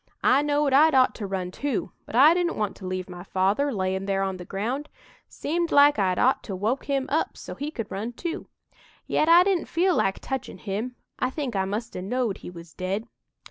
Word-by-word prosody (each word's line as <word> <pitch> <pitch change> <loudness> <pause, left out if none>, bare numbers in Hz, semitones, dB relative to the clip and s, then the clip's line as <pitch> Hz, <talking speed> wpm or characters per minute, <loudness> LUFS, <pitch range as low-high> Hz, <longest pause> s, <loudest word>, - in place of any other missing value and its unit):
I 265 +2 +5
knowed 290 -1 +1
I'd 305 +2 +6
ought 255 -1 +5
to 205 - -5
run 185 -2 -3
too, 275 +3 -2 0.2
but - - -7
I 290 +6 +8
didn't 345 -1 0
want 210 -2 -1
to 190 - -7
leave 185 0 -3
my 180 -1 -9
father 200 +10 +1
layin' 190 -2 -2
there 195 0 +1
on 190 -1 -2
the 180 - -9
ground. 240 - -3 0.4
Seemed 340 +2 -2
like 285 -3 +6
I'd 185 -2 +2
ought 260 +2 +3
to 195 - -4
woke 220 +8 -1
him 275 -2 0
up 310 +4 0
so - - -8
he 290 +2 -4
could 230 -9 -6
run 215 +5 -4
too. 340 +7 -5 0.6
Yet 310 - +1
I 345 +2 +8
didn't 375 -3 0
feel 355 +1 +2
like 195 - +1
touchin' 265 -2 -5
him. 220 +5 -4 0.2
I 255 - +1
think 265 -4 -4
I 190 -1 +1
must 215 +4 -4
'a' - - -4
knowed 230 +1 -1
he - - -8
was 170 -2 -12
dead. 195 +5 -3
235 Hz, 220 wpm, -25 LUFS, 195-290 Hz, 0.6 s, I